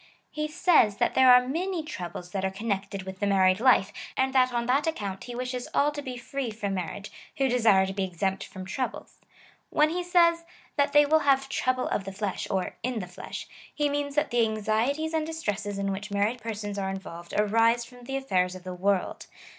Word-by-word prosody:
He 305 0 -2
says, 305 - +3
that - - +1
there 260 -1 +7
are 250 0 +6
many 345 +4 -2
troubles 180 - -7
that 195 0 -2
are 190 - +1
connected 195 -1 -3
with 190 0 -8
the 205 - 0
married 190 -1 +4
life, 225 -5 +4 0.2
and 265 0 +1
that 255 -1 +4
on 240 -1 -1
that 275 +6 +2
account 200 -11 -3
he 245 -1 -7
wishes 250 0 -4
all 290 +1 +3
to 295 0 -5
be 255 -3 -6
free 255 +1 -4
from 210 -2 -3
mar 180 -3 -2
riage, 205 +1 -8 0.3
who 270 - +2
desire 225 -6 +4
to 190 - -4
be 195 0 -1
exempt 190 +1 -2
from 185 -1 -9
troubles. 255 +7 -5 0.5
When 305 +1 +3
he 355 +1 -2
says, 340 -1 +4 0.3
that 285 -1 +1
they 295 0 +7
will 315 +2 +4
have 270 -2 +2
trouble 255 -1 0
of 195 - -1
the 195 - -5
flesh, 200 -1 -3
or 190 -2 -2
in 250 0 -2
the 200 - -3
flesh, 180 0 -8 0.2
he 295 -1 0
means, 285 0 -2
that 295 0 +1
the 240 0 +3
anxieties 225 +9 0
and 320 -1 +1
distresses 210 -11 -3
in 195 0 -1
which 200 +3 -5
married 205 +4 0
persons 210 -2 -4
are 190 -1 -2
involved 175 -3 -7
arise 230 +3 +3
from 245 0 -15
the 270 +2 -2
affairs 185 -9 0
of 185 - -10
the 185 0 -6
world. 190 +1 -1
230 Hz, 215 wpm, -27 LUFS, 195-275 Hz, 0.5 s, there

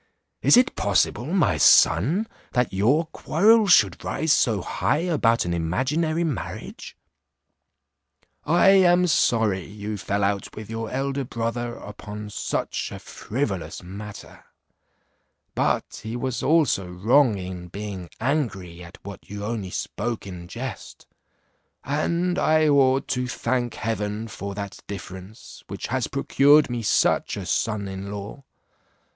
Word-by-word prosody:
Is - - +6
it 250 - +3
possible, 100 +5 +1
my 180 +2 +2
son, 150 - +5 0.3
that 125 -4 +1
your 125 - +2
quarrel 210 +7 +3
should 185 - +4
rise 160 -1 +1
so 110 -9 +2
high - - 0
about 145 - +2
an 85 - -1
imaginary 135 - 0
marriage? 155 -7 -5 1.5
I 175 +4 +4
am 180 -2 +5
sorry 110 - +2
you 105 +2 -6
fell 100 +1 -2
out 100 0 -1
with 110 0 -8
your 115 -1 -4
elder 135 +1 -2
brother 120 -1 -3
upon 105 0 -9
such - - -3
a - - -6
frivolous 105 -9 -4
matter; 100 +3 -10 1.1
but - - -1
he 110 +2 -5
was 125 0 -3
also 150 - +2
wrong 110 +6 +3
in 90 -1 -7
being 95 -2 -7
angry 110 - -2
at 85 0 -12
what 100 0 -10
you 100 0 -6
only 105 -4 -3
spoke 120 +4 -4
in 90 -3 -8
jest, 120 +6 -7 0.8
and 170 +6 0
I 155 -3 +3
ought 135 -2 +3
to 125 -1 -1
thank 120 -1 -2
heaven 110 0 -3
for 100 -3 -6
that 100 -1 -6
difference 95 +1 -9
which - - -6
has - - 0
procured 145 0 +4
me 120 -1 -2
such 110 - +1
a - - -5
son 105 -3 -1
in 95 +1 -6
law. 105 +7 -7
115 Hz, 130 wpm, -24 LUFS, 100-145 Hz, 1.5 s, Is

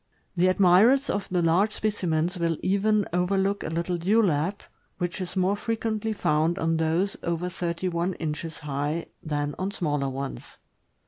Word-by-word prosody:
The 180 0 +3
admirers 200 +9 +5
of 200 - -3
the 180 -2 +1
large 185 +6 +3
specimens 180 -5 -1
will 165 -2 0
even 205 +2 +2
overlook 195 +3 +1
a - - -3
little 170 +2 -2
dewlap, 190 -2 +2 0.4
which 175 +1 -3
is 180 +1 -4
more 190 +1 +2
frequently 225 0 -2
found 160 -4 +1
on 165 0 +1
those 165 +5 0
over 170 +1 -2
thirty 175 0 -3
one 175 +1 -1
inches 160 0 -4
high 150 +2 -2 0.2
than 145 -2 -2
on 190 +1 -1
smaller 145 -8 -1
ones. 135 +1 -6
175 Hz, 150 wpm, -26 LUFS, 160-200 Hz, 0.4 s, admirers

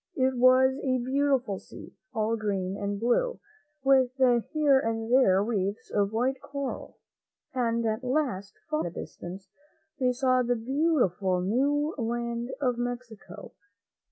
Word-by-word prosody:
It 260 0 +1
was 255 +2 +5
a 260 -2 +1
beautiful 260 -4 0
sea, - - -13 0.2
all 225 -1 0
green 195 -4 -2
and 200 0 -3
blue, 245 - +1 0.4
with 265 -2 +4 0.4
here 295 -3 +4
and 225 -1 -2
there 195 -7 +5
reefs 205 -2 -2
of 200 -1 +1
white 250 +4 0
coral, 280 -2 -6 0.6
and 235 -2 0
at 220 +2 -1
last, 250 - -2
far 150 - -1
in 160 - -1
the - - -6
distance, 190 +2 -8 0.5
they 255 -1 +2
saw 255 0 +2
the 245 0 +1
beautiful 225 - +1
new 285 - +1
land 235 +1 -2
of 250 -4 0
Mexico. 240 -6 -6
240 Hz, 135 wpm, -28 LUFS, 210-265 Hz, 0.6 s, was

